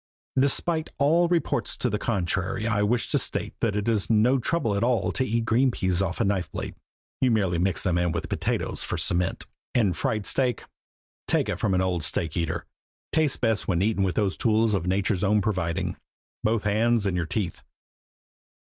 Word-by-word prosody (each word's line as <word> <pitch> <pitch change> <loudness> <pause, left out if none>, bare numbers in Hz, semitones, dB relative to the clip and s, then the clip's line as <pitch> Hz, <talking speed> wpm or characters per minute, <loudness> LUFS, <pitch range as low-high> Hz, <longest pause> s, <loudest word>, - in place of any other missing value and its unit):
Despite 160 +4 +1
all 165 +5 +4
reports 170 -1 0
to - - 0
the 105 -3 -1
contrary, 95 -1 -1
I 110 -2 +1
wish 115 +3 +1
to - - +2
state - - -2
that 110 -3 0
it 105 +1 -1
is 110 -4 +1
no 115 +4 +4
trouble 120 -3 0
at 100 - 0
all 120 -1 +1
to 130 - 0
eat 115 -1 -1
green 125 +4 +3
peas 95 -6 0
off 90 -2 -2
a - - +3
knife 95 -4 -1
blade - - -5 0.5
you 130 - +3
merely 95 -7 +1
mix 95 0 +1
them 90 -2 +1
in 85 -1 +1
with 85 - -3
potatoes - - -2
for - - -3
a - - -3
cement; 85 +1 0 0.3
and 105 -8 +3
fried 105 +4 -1
steak 125 -2 0 0.6
take - - +1
it - - -2
from 95 - +1
an 90 - +2
old 90 -3 -1
steak 80 +1 -1
eater 85 -2 -2 0.5
tastes 155 -4 +2
best 115 -3 0
when 90 -1 +1
eaten 105 -1 +1
with 95 -2 0
those 100 -3 0
tools 110 -1 +2
of 90 -3 -1
Nature's 95 0 +1
own 105 +1 +3
providing, 95 -5 -1 0.5
both 110 0 +1
hands 110 +1 +2
and 95 -2 0
your 85 -2 -1
teeth. 95 -4 -3
105 Hz, 195 wpm, -26 LUFS, 95-115 Hz, 0.6 s, all